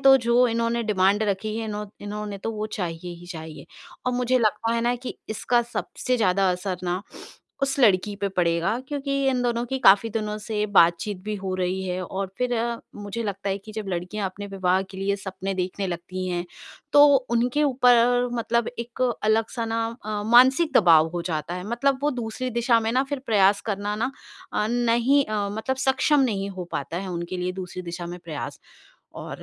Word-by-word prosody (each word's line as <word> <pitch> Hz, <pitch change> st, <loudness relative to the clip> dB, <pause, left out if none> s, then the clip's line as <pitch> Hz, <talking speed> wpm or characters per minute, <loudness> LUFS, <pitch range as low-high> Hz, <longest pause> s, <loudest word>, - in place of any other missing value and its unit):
तो 270 Hz, 0 st, +8 dB
जो 245 Hz, 0 st, +3 dB
इन्होंने 230 Hz, 0 st, 0 dB
डिमांड 205 Hz, -1 st, +2 dB
रखी 215 Hz, +1 st, -1 dB
है, 225 Hz, -, -3 dB
इन्हों 210 Hz, -1 st, -4 dB, 0.2 s
इन्होंने 205 Hz, 0 st, -5 dB
तो 225 Hz, -, -3 dB
वो 215 Hz, 0 st, -3 dB
चाहिए 175 Hz, -4 st, -5 dB
ही 175 Hz, -, -12 dB
चाहिए। 160 Hz, -4 st, -8 dB, 0.4 s
और 250 Hz, -, +2 dB
मुझे 250 Hz, +1 st, +2 dB
लगता 225 Hz, 0 st, +1 dB
है 230 Hz, -, +1 dB
ना, 240 Hz, +1 st, +1 dB
कि 250 Hz, +1 st, -7 dB
इसका 240 Hz, +2 st, +1 dB
सबसे 250 Hz, +1 st, -3 dB
ज़्यादा 195 Hz, -3 st, +3 dB
असर 180 Hz, 0 st, -3 dB
ना 180 Hz, +2 st, -1 dB, 0.6 s
उस 275 Hz, 0 st, 0 dB
लड़की 205 Hz, -2 st, +4 dB
पे 200 Hz, -, 0 dB
पड़ेगा 180 Hz, +4 st, +1 dB
क्योंकि 280 Hz, -1 st, -3 dB, 0.2 s
इन 255 Hz, -2 st, +1 dB
दोनों 240 Hz, -1 st, 0 dB
की 265 Hz, +2 st, -2 dB
काफ़ी 200 Hz, +4 st, +7 dB
दिनों 210 Hz, -1 st, -2 dB
से 210 Hz, 0 st, -2 dB
बातचीत 175 Hz, +4 st, +4 dB
भी 215 Hz, 0 st, -2 dB
हो 190 Hz, -1 st, -4 dB
रही 185 Hz, +1 st, -1 dB
है, 180 Hz, +1 st, -2 dB
और 195 Hz, +2 st, -3 dB
फिर 250 Hz, 0 st, 0 dB, 0.4 s
मुझे 205 Hz, +3 st, -5 dB
लगता 200 Hz, -2 st, -3 dB
है 195 Hz, -, -1 dB
कि 215 Hz, +2 st, -12 dB
जब 215 Hz, -2 st, -5 dB
लड़कियाँ 185 Hz, +3 st, -3 dB
अपने 200 Hz, +2 st, -8 dB
विवाह 190 Hz, -1 st, +1 dB
के 190 Hz, -, -10 dB
लिए 200 Hz, +1 st, 0 dB
सपने 195 Hz, 0 st, -5 dB
देखने 190 Hz, +1 st, -2 dB
लगती 180 Hz, +1 st, -4 dB
हैं, 175 Hz, -1 st, -2 dB, 0.5 s
तो 290 Hz, 0 st, +9 dB, 0.2 s
उनके 245 Hz, +5 st, +2 dB
ऊपर, 245 Hz, -2 st, +4 dB
मतलब, 235 Hz, 0 st, 0 dB
एक 235 Hz, +2 st, -4 dB, 0.2 s
अलग-सा 225 Hz, +2 st, +1 dB
ना 225 Hz, 0 st, -1 dB, 0.2 s
अ, 210 Hz, -1 st, -2 dB
मानसिक 260 Hz, +7 st, +5 dB
दबाव 165 Hz, -5 st, +6 dB
हो 175 Hz, -, -2 dB
जाता 155 Hz, +2 st, -3 dB
है। 180 Hz, +1 st, -5 dB
मतलब, 260 Hz, +3 st, +1 dB
वो 295 Hz, -, +2 dB
दूसरी 235 Hz, +3 st, -4 dB
दिशा 235 Hz, 0 st, +2 dB
में 225 Hz, 0 st, -1 dB
ना 260 Hz, +2 st, +3 dB
फिर 285 Hz, -, -1 dB
प्रयास 200 Hz, -2 st, +4 dB
करना 205 Hz, +1 st, -2 dB
ना 265 Hz, -, -2 dB, 0.6 s
नहीं 240 Hz, +4 st, +3 dB
अ, 210 Hz, -2 st, -1 dB
मतलब, 220 Hz, +5 st, -2 dB
सक्षम 270 Hz, +2 st, +3 dB
नहीं 195 Hz, -1 st, -3 dB
हो 185 Hz, -2 st, -6 dB
पाता 140 Hz, +4 st, -3 dB
है 190 Hz, 0 st, -5 dB
उनके 170 Hz, +1 st, -4 dB
लिए 180 Hz, 0 st, -2 dB
दूसरी 180 Hz, 0 st, -7 dB
दिशा 175 Hz, 0 st, -6 dB
में 175 Hz, +1 st, -7 dB
प्रयास। 155 Hz, -3 st, -6 dB, 0.6 s
और -, -, -7 dB
210 Hz, 190 wpm, -24 LUFS, 185-235 Hz, 0.6 s, तो